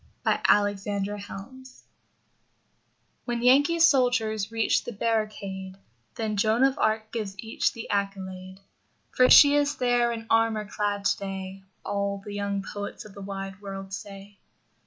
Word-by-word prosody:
Mark - - +1
Twain 205 -1 +3
and 200 -1 -1
Joan 205 - -4
of 205 -1 -8
Arc 195 +4 -8 1.8
When 240 -1 -2
Yankee 285 +7 +5
soldiers 245 -9 +3
reach 225 -1 +1
the - - -6
barricade 200 -4 -3 0.4
Then 215 -2 -2
Joan 220 +4 +2
of 270 0 +2
Arc 220 0 0
gives 210 -4 -4
each 220 +3 -1
the 230 - -8
accolade. 190 -1 -4 0.5
For 255 0 +4
she 285 -1 +9
is 290 0 +2
there 245 -1 +2
in 225 -1 -5
armor 225 -1 +2
clad, 205 0 -2
today, 195 -1 -3 0.2
All 200 0 -2
the 205 - -7
young 200 -1 -2
poets 205 +1 -7
of 210 - -12
the 200 - -10
wide 195 0 -6
world 195 -1 -7
say. 195 0 -9
205 Hz, 150 wpm, -26 LUFS, 195-230 Hz, 1.8 s, she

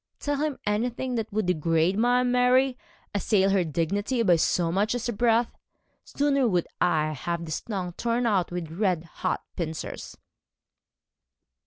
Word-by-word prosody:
'Tell 290 -1 -1
him 295 -1 -1
anything 240 +4 -1
that 225 -2 -3
would 215 0 0
degrade 165 +1 +1
my 245 +3 +3
Mary? 250 +1 +3 0.4
Assail 195 -1 +2
her 195 -2 +3
dignity 200 - -1
by 180 -5 +5
so 165 +1 +1
much 205 +6 +1
as 245 -1 -3
a 240 - -1
breath? 230 +2 +2 0.5
Sooner 280 -2 +1
would 180 -5 +1
I 155 -3 +2
have 170 +4 -3
this 155 -2 -3
tongue 185 -5 -4
torn 240 +5 -1
out 195 -6 +1
with 175 -3 -5
red 180 -2 0
hot 180 +2 -3
pincers.' 160 -2 -5
205 Hz, 150 wpm, -26 LUFS, 170-245 Hz, 0.5 s, by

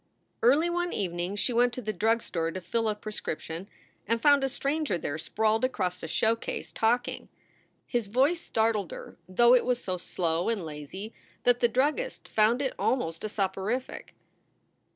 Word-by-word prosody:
Early 285 +8 +5
one 350 0 -1
evening 180 0 -2
she 240 +4 0
went 245 +1 +3
to 255 - -4
the 215 0 -2
drug 225 +4 +2
store 165 -1 -2
to 185 - -5
fill 225 +5 -1
a 210 - 0
prescription, 195 -4 -5 0.4
and 230 +2 +1
found 285 +2 +5
a 270 - +1
stranger 280 - -1
there 155 -1 -4
sprawled 220 +6 +1
across 185 -8 -1
a - - -5
showcase, 225 +7 -1
talking. 235 +2 0 0.6
His 240 -4 -1
voice 275 - +2
startled 220 - 0
her, - - -9
though 235 +6 +5
it 250 - +5
was 250 -1 0
so 185 -1 -2
slow 170 +1 -1
and 210 -7 -1
lazy 155 +8 -7 0.3
that 245 0 +4
the 240 - +4
druggist 295 - 0
found 225 +5 +3
it 265 - -1
almost 165 -11 0
a 215 - -2
soporific. 200 +5 -3
225 Hz, 170 wpm, -28 LUFS, 185-250 Hz, 0.6 s, Early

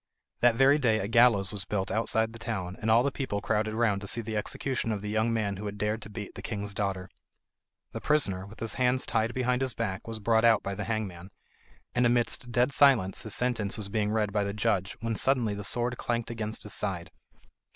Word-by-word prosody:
That 120 -1 +4
very 135 +4 +5
day 115 -6 +3
a 100 - -2
gallows 115 -4 +4
was 100 -2 -4
built 100 -2 -2
outside 110 0 0
the 115 - -10
town, 95 -5 -4
and 110 - -1
all 115 +2 +5
the 140 - 0
people 130 -7 -3
crowded 110 +1 -1
round 110 -4 +1
to 100 - -6
see 115 - +2
the 110 0 -5
execution 130 +2 -2
of 105 -2 -3
the 105 - -3
young 110 +2 +1
man 105 -4 -1
who 105 +2 -5
had 105 0 -6
dared 105 +2 -1
to 105 - -10
beat 105 -1 -7
the - - -8
king's 105 -2 -4
daughter. 95 -2 -2 0.8
The - - -6
prisoner, 100 -11 +1
with 110 - -14
his 115 -3 0
hands 125 0 +1
tied 115 +1 0
behind 125 0 +1
his 130 -3 0
back, 100 -4 -3
was 115 -1 -5
brought 110 +1 +2
out 115 -2 +5
by 100 - -3
the 100 +1 -4
hangman, 100 -5 -4 0.6
and 120 0 +3
amidst 120 0 0
dead 125 +2 +2
silence 125 -11 +4
his 110 - -3
sentence 115 -5 0
was 105 -2 -6
being 105 0 0
read 105 -2 0
by 105 -1 +1
the 100 0 -3
judge 105 -3 0
when 115 -1 -1
suddenly 120 -3 +1
the 100 0 -5
sword 120 +4 0
clanked 120 -1 -2
against 110 -1 -4
his 105 - -7
side. 90 -5 -3
110 Hz, 225 wpm, -28 LUFS, 100-120 Hz, 0.8 s, very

